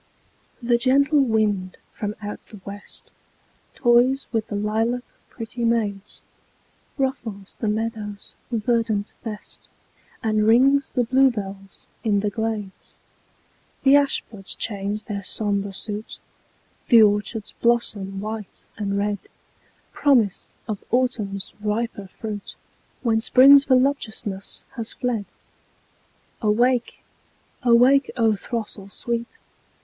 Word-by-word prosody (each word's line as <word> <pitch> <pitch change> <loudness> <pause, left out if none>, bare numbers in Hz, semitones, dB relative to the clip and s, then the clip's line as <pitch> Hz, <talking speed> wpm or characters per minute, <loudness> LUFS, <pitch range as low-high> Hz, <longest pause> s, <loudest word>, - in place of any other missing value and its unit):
The 235 0 +3
gentle 280 +4 +4
wind 210 -6 0 0.2
from 210 0 -4
out 205 0 -5
the 210 - -12
west 200 +1 -9 0.6
Toys 245 +2 +3
with 225 -2 -1
the 205 - -4
lilac 220 +4 0 0.3
pretty 235 +1 -6
maids; 210 -4 -1 0.7
Ruffles 235 -8 -3
the 220 - 0
meadow's 210 -1 -3 0.2
verdant 225 -2 0
vest, 215 -2 -8 0.5
And 215 -1 +2
rings 270 +5 +5
the 250 - +1
bluebells 210 -7 0
in 205 -3 +2
the 210 0 -1
glades; 215 -2 -4 0.9
The 270 +1 +7
ash 285 -1 +3
buds 195 -4 -9
change 205 0 -2
their 200 -2 -4
sombre 200 0 -1
suit, 210 +2 -6 0.7
The 230 -3 +8
orchards 210 +1 0
blossom 210 -5 +1
white 215 -1 -6
and 200 -2 -1
red— 205 0 0 0.7
Promise 235 -9 +2
of 210 -3 -4
Autumn's 220 -6 -1
riper 210 -1 -2
fruit, 205 +1 -7 0.5
When 225 -2 +2
Spring's 275 +4 +8
voluptuousness 250 -7 0
has 225 -1 -2
fled. 235 -5 -2 1.2
Awake! 240 +3 +1 0.6
awake, 255 +2 +5
O 225 -2 +3
throstle 210 -2 -5
sweet! 235 +2 -4
220 Hz, 105 wpm, -23 LUFS, 205-240 Hz, 1.2 s, The